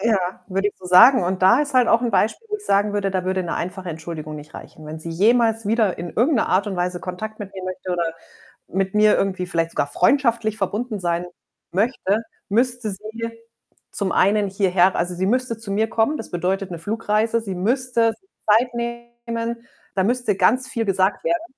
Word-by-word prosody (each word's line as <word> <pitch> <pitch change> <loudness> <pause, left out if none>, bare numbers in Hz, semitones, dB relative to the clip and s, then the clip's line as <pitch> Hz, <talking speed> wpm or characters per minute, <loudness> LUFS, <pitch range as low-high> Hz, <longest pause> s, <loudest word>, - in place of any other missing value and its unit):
Ja, 195 -4 0
würde 195 +1 0
ich - - -10
so 185 - -16
sagen, 190 +5 +7
und 185 +1 -2
da 190 +8 +6
ist 290 -2 -2
halt 250 -2 +4
auch 230 +1 +4
'n 240 - -1
Beispiel, 225 - +1
wo 420 - -2
ich 415 - -11
sagen 205 +1 +2
würde, 200 -1 0
da 185 -1 -2
würde 185 0 0
‘ne 170 - -3
einfache 185 +1 -5
Entschuldigung 155 -1 -6
nicht 150 0 -12
reichen. 155 - -11
Wenn 155 +1 -7
sie 165 - -7
jemals 225 +4 +2
wieder 215 -3 +1
in 175 0 -5
irgend 260 +6 +2
'ne 225 - +1
Art 200 +3 +2
und 190 - -4
Weise 180 0 -2
Kontakt 215 +4 -6
mit 195 -1 -7
mir 190 -1 -7
möchte 185 0 -5
oder 175 -1 0 0.6
mit 190 0 -2
mir 210 0 +5
irgendwie 185 -2 -1
vielleicht 165 -1 -1
sogar - - -1
freundschaftlich 230 - +2
verbunden 210 +3 -2
sein 175 0 -1 0.4
möchte, 205 0 +1 0.3
müsste 240 +1 +1
sie 220 +4 -3 0.6
zum 200 -2 -1
einen 200 +1 +3
hierher 190 -1 +2
also, 175 +1 -1
sie 185 +2 -1
müsste 250 0 0
zu 220 -3 -4
mir 220 +3 +1
kommen. 230 +7 +1
Das - - -8
bedeutet 185 +2 -1
'ne 170 - -6
Flugreise, 220 +3 0
sie 195 -4 -5
müsste 230 +3 +1
sich 385 - -33 0.3
Zeit 245 +1 -3
nehmen, 235 0 -5 0.3
da 190 - +2
müsste 245 -1 +1
ganz 250 +7 +3
viel 230 -2 -2
gesagt 190 0 +1
werden, 340 -1 0
205 Hz, 205 wpm, -22 LUFS, 185-230 Hz, 0.6 s, sagen